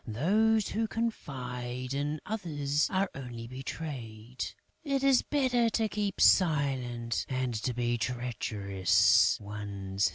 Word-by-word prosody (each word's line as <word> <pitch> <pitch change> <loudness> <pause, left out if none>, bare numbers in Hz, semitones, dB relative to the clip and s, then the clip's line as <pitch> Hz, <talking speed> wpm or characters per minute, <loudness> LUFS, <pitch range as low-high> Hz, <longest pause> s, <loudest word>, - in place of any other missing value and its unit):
Those 205 - +2
who 225 +1 -1
confide 130 - -4
in 145 +2 -2
others 150 -8 -1
are 195 +1 +1
only 120 -4 -7
betrayed; 125 -3 -6 0.4
it 275 -2 0
is 275 -2 +5
better 250 -5 +2
to 225 0 +1
keep 205 -2 -2
silent 130 -9 +2
and 130 -2 -1
to 125 - -1
be 120 0 -1
treacherous 105 -6 +2
one's 100 -1 -3
self." - - +4
130 Hz, 120 wpm, -30 LUFS, 120-200 Hz, 0.4 s, is